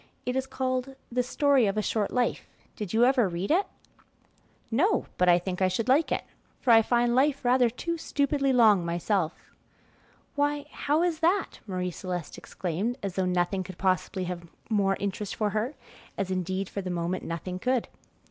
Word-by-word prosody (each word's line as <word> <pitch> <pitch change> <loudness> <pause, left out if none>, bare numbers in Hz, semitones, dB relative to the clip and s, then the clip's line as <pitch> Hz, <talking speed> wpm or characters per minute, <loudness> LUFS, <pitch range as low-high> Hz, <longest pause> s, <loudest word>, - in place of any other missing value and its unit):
"It 250 - -1
is 265 0 -1
called 260 0 -2 0.2
'The 250 +1 +2
Story 270 -1 +3
of 195 +2 -1
a 215 - +1
Short 210 0 0
Life.' 250 -1 -1 0.3
Did 205 -4 -5
you 230 +2 +4
ever 250 -6 +3
read 175 +6 -3
it?" 380 +5 +3 1.0
"No, 365 - +2
but 180 0 +4
I 175 - +7
think 180 +1 -4
I 185 - +5
should 200 +5 -1
like 280 +5 +3
it, - - 0 0.4
for 250 - +2
I 225 -1 +8
find 240 +1 +2
life 275 +1 +2
rather 245 0 +4
too 335 +8 -4
stupidly 280 -2 +1
long 220 -7 +5
myself." 170 0 -2 0.8
"Why, 290 0 0
how 300 +4 +1
is 340 -3 0
that?" 360 +4 +1
Marie 180 -2 -2
Celeste 175 -4 -5
exclaimed, 190 +8 -3
as 195 -2 -2
though 190 0 0
nothing 180 +1 0
could 185 -1 -10
possibly 185 0 0
have 175 -1 -5 0.2
more 195 -2 +2
interest 200 0 -3
for 210 -2 0
her, 225 +7 -2 0.4
as 195 -2 -2
indeed, 185 +1 -2
for 200 - -4
the 185 - -5
moment, 175 +1 -2
nothing 180 +2 -4
could. 250 +2 0
215 Hz, 180 wpm, -27 LUFS, 185-260 Hz, 1.0 s, I